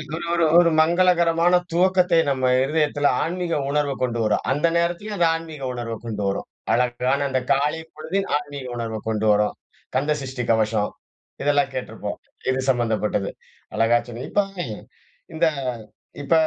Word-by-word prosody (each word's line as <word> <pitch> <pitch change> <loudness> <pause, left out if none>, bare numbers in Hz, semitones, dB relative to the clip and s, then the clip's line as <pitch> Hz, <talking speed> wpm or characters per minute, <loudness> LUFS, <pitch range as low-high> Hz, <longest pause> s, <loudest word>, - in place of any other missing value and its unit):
ஒரு 170 - -5
ஒரு 170 -1 +2 0.2
ஒரு 175 -1 +5
மங்களகரமான 170 0 +3 0.2
துவக்கத்தை 180 0 +3
நம்ம 130 -2 0 0.2
இருதயத்தில 145 0 +1 0.2
ஆன்மீக 175 0 -2
உணர்வு 145 -1 +1
கொண்டு 120 -2 -1
வரும். 105 -1 +1
அந்த 145 +5 +2
நேரத்திலயும் 175 +5 -1
அந்த 170 -2 +4
ஆன்மீக 160 -3 -7
உணர்வ 120 -2 -4
கொண்டு 105 -3 -3
வரும். 100 - -2 0.3
அழகான 125 +3 +1
அந்த 130 -1 +1
காலை 150 +4 0
பொழுது 160 +5 -2 0.2
ஆன்மீக 145 -2 -7
உணர்வை 115 -2 -3
கொண்டு 110 -1 -1
வரும். 105 0 +2 0.4
கந்த 145 +4 +2
சஷ்டி 130 -2 -4
கவசம், 110 -2 +1 0.5
இதெல்லாம் 145 -1 +2
கேட்டிருப்போம். 130 - -5 0.3
இது 130 - -1
சம்மந்தப்பட்டது. 110 -5 0 0.5
அழகா 115 +2 +4
சொன்ன 120 +1 -6
இப்போ, 205 -1 +2 0.9
இந்த 165 - +2 0.8
இப்ப 140 - 0
140 Hz, 140 wpm, -23 LUFS, 120-165 Hz, 0.9 s, ஒரு